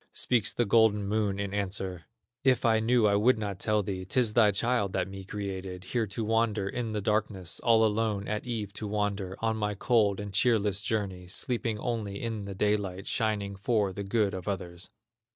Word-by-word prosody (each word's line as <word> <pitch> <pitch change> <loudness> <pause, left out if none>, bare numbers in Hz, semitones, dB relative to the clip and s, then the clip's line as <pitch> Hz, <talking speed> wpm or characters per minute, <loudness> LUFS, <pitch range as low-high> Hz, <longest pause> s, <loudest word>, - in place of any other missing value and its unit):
Speaks 115 -3 +2
the 120 - 0
golden 105 -1 +4
Moon 105 -1 0
in 100 -1 -3
answer: 95 -4 -3 0.4
"If 130 -2 +3
I 110 -1 +4
knew 115 0 +3
I 100 -1 +4
would 115 +5 +4
not 100 -3 -4
tell 105 0 +1
thee; 95 -1 -4
'Tis 110 +3 +2
thy 110 -3 +6
child 105 0 +1
that - - 0
me 95 0 -8
created, 95 -2 -5
Here 115 +2 -1
to 110 +3 -3
wander 110 -2 +1
in 115 +1 -3
the 105 - -1
darkness, 100 -5 -1
All 115 -1 +4
alone 105 -2 0
at 105 0 -2
eve 105 -4 -3
to 105 - -5
wander 100 -2 -2
On 110 -1 +1
my 105 -1 -1
cold 105 -2 +2
and 100 -1 -6
cheerless 105 -2 +2
journey, 100 -5 -2
Sleeping 115 +3 -1
only 105 -4 -3
in 110 -3 -4
the 100 -1 -6
daylight, 100 -2 0
Shining 105 -3 -1
for 100 -1 0
the 100 - -5
good 100 0 +1
of 95 0 -6
others." 90 -3 -4
105 Hz, 190 wpm, -29 LUFS, 100-110 Hz, 0.4 s, thy